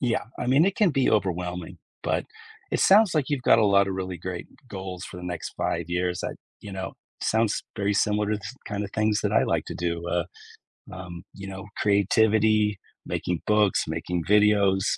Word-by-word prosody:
Yeah. 120 -3 0
I - - -3
mean, 135 +6 +5
it 195 +1 0
can 210 -5 +4
be 135 -3 +2
overwhelming, 90 -4 -1 0.2
but - - 0 0.5
it - - 0
sounds 205 0 +6
like 150 -4 +1
you've 145 -4 -1
got - - +5
a 110 - +4
lotta 100 -1 +4
really 95 -1 -4
great 90 +1 -5 0.2
goals 95 -3 -6
for - - -9
the 90 - -8
next 90 -2 -5
5 85 0 -1
years 90 0 -1
that, - - -4 0.2
you 100 -2 -9
know, 95 0 -5 0.3
sounds 110 -1 +1
very 100 -1 0
similar 105 +1 +1
to 105 - +1
the 105 - -11 0.2
kinda 100 -1 -3
things 110 +1 +1
that - - 0
I - - +4
like - - 0
to - - -6
do. 85 0 -3
Uh, 85 -1 0 0.7
um, 90 -2 -8
you 100 -1 -9
know, 95 +1 -7
creativity, 105 +1 +3 0.3
making 90 -2 -2
books, 105 -2 +3
making 80 +2 -2
videos. 100 -1 +4
100 Hz, 190 wpm, -26 LUFS, 90-110 Hz, 0.7 s, sounds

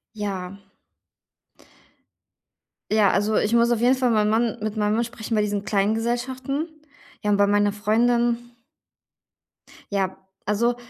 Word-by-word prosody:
Ja. 195 -3 -4 2.4
Ja, 215 -3 +4
also, 210 +2 +1
ich 215 - +1
muss 235 0 +4
auf 230 - +1
jeden 250 +2 +4
Fall 255 -1 +1
meinen 210 -1 +2
Mann 230 +1 +1
mit 215 0 -3
meinem 210 0 +1
Mann 235 - +1
sprechen 230 -1 -5
bei 210 - +3
diesen 205 -1 -1
kleinen 205 +1 +1
Gesellschaften. 255 +6 -2 0.5
Ja, 210 -1 0
und 200 - +3
bei 200 0 +4
meiner 205 0 +3
Freundin 235 +3 +2 1.5
Ja, 190 -1 -1 0.3
also, 235 +4 +1
215 Hz, 140 wpm, -23 LUFS, 205-235 Hz, 2.4 s, Ja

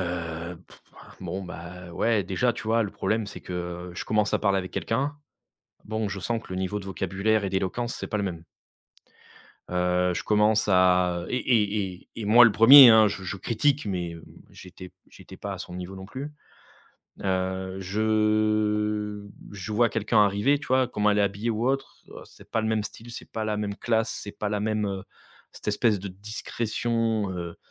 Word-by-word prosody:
hein, 85 -1 -4 0.6
bon, 95 +2 -4
bah, 90 0 -9
ouais, 110 +2 +1
déjà, 115 +7 0
tu - - -8
vois, 115 +1 +2
le 100 - -3
problème 110 +2 -1
c'est - - -9
que, 90 0 -6
je - - -5
commence 105 -1 +1
à - - +2
parler 100 -2 +2
avec 90 0 -5
quelqu'un. 140 +6 -2 0.7
Bon, 110 -1 -2
je 100 -1 -5
sens 115 +3 -2
que - - -10
le 95 - -3
niveau 95 +2 -2
de - - -11
vocabulaire 100 +3 0
et - - -1
d'éloquence, 95 +6 -2
c'est - - -6
pas 105 - -2
le - - -1
même. 85 -4 -4 1.3
Heu, 90 0 +1
je - - -3
commence 105 0 +3
à 90 -2 +3
et 125 - -1
et 105 -6 +1
et 90 - -15
et 110 - -5
moi 120 +4 +8
le 110 - +3
1er 125 +4 +10
hein, 110 -1 +7
je 95 - -6
je 95 +2 -4
critique 135 +8 0
mais 90 -4 -3
hem, 85 - -11 0.3
j'étais 90 0 -12
p - - -32 0.2
j'étais - - -13
pas - - -5
à - - -9
son 90 - -8
niveau 90 +1 -6
non 95 0 -9
plus. 140 +6 -7 0.9
Heu, 95 0 -2
je 105 0 0 0.3
je 100 +2 -6
vois 115 +2 +3
quelqu'un 110 -1 +3
arriver, 105 +9 +2
tu 150 - -10
vois 130 -1 +3
comment 105 -2 +1
elle 105 - +2
est - - +4
habillé 100 +4 -1
ou 115 +3 0
autre, 135 0 -3
oh - - -11
c'est - - -18
pas 115 - 0
le - - -1
même 110 -1 +1
style, 115 +3 -9
c'est - - -10
pas 110 -1 -3
la 105 -1 -1
même 100 -1 -3
classe, 115 -1 0
c'est 105 - -7
pas 105 - -2
la 105 0 -1
même, 110 -1 0
heu, 95 -1 -4 0.5
cette - - -8
espèce 105 0 +2
de 100 +1 -6
discrétion, 110 +1 -2
heu, 85 -2 -6
105 Hz, 200 wpm, -26 LUFS, 95-110 Hz, 1.3 s, 1er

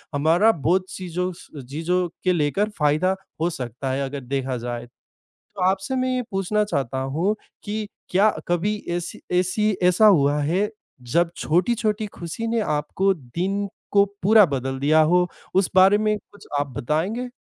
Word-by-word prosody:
हमारा 165 +9 +4
बहुत 185 +1 +1
चीज़ों 180 0 -3
स - - -15 0.2
चीज़ों 170 +7 -1 0.2
के 185 -1 +3
लेकर 175 +7 +1
फ़ायदा 155 +6 +2 0.3
हो 170 - +2
सकता 130 -2 -4
है, 135 +1 -1
अगर 140 +1 -5
देखा 130 0 -2
जाए। 120 0 -5 0.5
तो 185 - -9
आपसे 195 +7 -2
मैं 255 0 0
ये 250 - 0
पूछना 195 +2 0
चाहता 135 - -2
हूँ 160 +11 0 0.3
कि 210 0 -3 0.2
क्या 200 +4 +4 0.2
कभी 175 +5 +1
ऐसी 175 0 -4 0.2
ऐसी 210 +4 +1
ऐसा 180 +4 +5
हुआ 145 -7 +5
है, 185 +8 +1 0.3
जब 165 +8 +1
छोटी-छोटी 210 +5 0
खुशी 200 +3 -6
ने 230 0 0
आपको 185 +3 0
दिन 185 +8 -3 0.2
को 200 0 +6 0.2
पूरा 215 +1 +7
बदल 135 -2 -3
दिया 155 +3 +4
हो? 180 +3 +3 0.3
उस 190 0 +2
बारे 190 +2 +6
में 215 0 +1
कुछ 205 - -16
आप 145 - 0
बताएँगे? 185 - -1
180 Hz, 160 wpm, -23 LUFS, 145-205 Hz, 0.5 s, पूरा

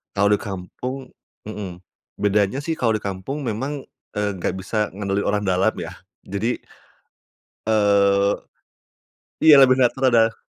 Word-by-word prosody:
Kalau 100 0 +3
di 105 - +4
kampung 125 +7 -6 0.4
mmm, 95 -5 -7 0.4
bedanya 105 +5 +2
sih 160 +2 -3
kalau 115 -2 +2
di 110 - -2
kampung 100 +9 -4
memang, 135 +4 -3 0.3
eee, 105 0 0
nggak 90 - -2
bisa 105 +1 -2
ngandelin 100 0 -2
orang 105 0 +1
dalam 95 -1 +2
ya. - - -5 0.4
Jadi, 105 +5 -2 1.0
eee 100 -2 +3 1.1
iya 155 -1 +8
lah - - +9
bener, 130 -1 +5
kan 130 -1 +2
ada, 115 -1 +4
105 Hz, 135 wpm, -22 LUFS, 100-125 Hz, 1.1 s, lah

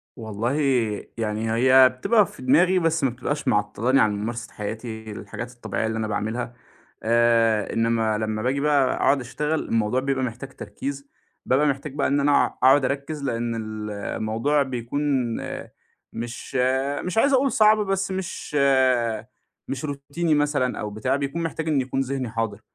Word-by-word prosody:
والله 110 0 -3 0.7
يعني 110 0 -2
هي 130 +2 +6
بتبقى 205 - +3
في 165 - -13
دماغي، 175 +9 +4
بس 165 -2 +1
ما 135 - +4
بتبقاش 135 +4 -4
معطلاني 110 +6 +2
عن 110 - +3
ممارسة 115 +1 -5
حياتي 110 +1 -6
الحاجات 105 +4 -7
الطبيعيّة 120 -2 -3
اللي 110 0 -2
أنا 110 -1 -1
باعملها. 110 +3 -3 0.5
آآ، 115 -2 +3
إنّما 115 -1 +1
لمّا 110 0 -2
باجي 130 +4 0
بقى 140 -3 +3
أقعد 140 - +3
أشتغل 150 +5 -2
الموضوع 115 +2 +1
بيبقى 135 0 -1
محتاج 125 +2 -5
تركيز، 140 0 -6 0.4
بابقى 140 +4 +3
محتاج 140 0 -2
بقى 145 - +1
إن 140 - +2
أنا 145 0 +4
أقعد 130 +1 +3
أركّز 140 +2 -3
لأن 115 -3 -2 0.4
الموضوع 110 +7 0
بيكون 125 +1 -4 1.1
مش 120 +2 -7 0.5
مش 180 +4 -3
عايز 280 +5 +4
أقول 270 0 +3
صعب، 215 -1 +5
بس 195 0 -1
مش 190 -5 -5 1.1
مش 140 +3 -4
روتيني 145 +3 -1
مثلًا 145 -4 0
أو 105 - -3
بتاع 110 +6 -1
بيكون 140 +4 -2
محتاج 160 0 -3
إنّ 145 -4 +2
يكون 130 +1 -3
ذهني 135 -2 -3
حاضر، 110 -2 -3
130 Hz, 150 wpm, -24 LUFS, 115-145 Hz, 1.1 s, هي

